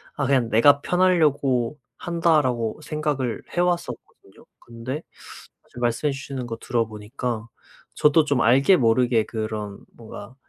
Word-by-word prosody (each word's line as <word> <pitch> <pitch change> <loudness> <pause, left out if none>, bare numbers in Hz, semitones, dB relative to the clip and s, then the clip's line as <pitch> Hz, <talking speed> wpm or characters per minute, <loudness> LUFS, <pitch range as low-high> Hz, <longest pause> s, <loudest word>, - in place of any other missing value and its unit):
'아 145 - -1
그냥 130 -4 +2
내가 140 +6 +5
편하려고 150 -8 +1 0.2
한다.'라고 150 -10 0
생각을 145 -7 -3
해 - - 0
왔었거든요. 175 -1 -4
근데 120 +4 -6 0.7
아 - - -31
저 - - -9
말씀해 120 +5 0
주시는 135 -2 -6
거 115 -1 -5
들어보니까 115 0 -3 0.5
저도 150 +1 +3
좀 140 -4 +1
알게 135 +10 +5
모르게 115 -1 +2
그런 110 -2 -5
뭔가 110 +1 -11
125 Hz, 285 characters per minute, -23 LUFS, 115-150 Hz, 0.7 s, 내가